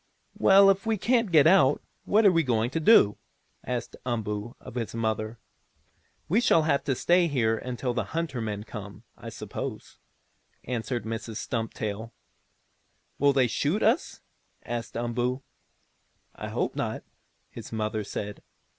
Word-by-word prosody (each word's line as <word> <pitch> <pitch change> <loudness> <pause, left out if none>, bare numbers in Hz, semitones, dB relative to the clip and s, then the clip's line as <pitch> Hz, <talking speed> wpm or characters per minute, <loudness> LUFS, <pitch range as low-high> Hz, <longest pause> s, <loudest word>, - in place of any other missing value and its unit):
"Well, 195 0 +7
if 195 +3 -3
we 220 -1 +1
can't 230 -1 +1
get 155 -3 +6
out, 150 -5 +5 0.3
what 215 +1 +3
are 200 - +8
we 165 -2 +3
going 120 -3 0
to 165 - -1
do?" 155 - +5 0.4
asked 125 -1 -4
Umboo 110 -2 -3
of - - -11
his 115 -2 -4
mother. 110 0 -2 0.9
"We 210 +8 +3
shall 165 -9 +4
have 155 -3 +1
to 135 - +1
stay 175 +5 +3
here 120 -7 +1
until 125 +2 -3
the 125 - -1
hunter 160 -7 -3
men 105 -2 -4
come, 105 -1 -9
I - - -9
suppose," - - -7 0.6
answered 120 -1 -3
Mrs. 115 0 -5
Stumptail. 110 -1 -4 1.1
"Will 145 +1 +5
they 135 -2 +3
shoot 145 - 0
us?" 235 - +1 0.4
asked 120 -1 -5
Umboo. 120 +2 -1 0.9
"I - - -7
hope - - -2
not," - - -3 0.5
his - - -9
mother 110 -1 -2
said. 105 0 -6
125 Hz, 145 wpm, -27 LUFS, 110-165 Hz, 1.1 s, are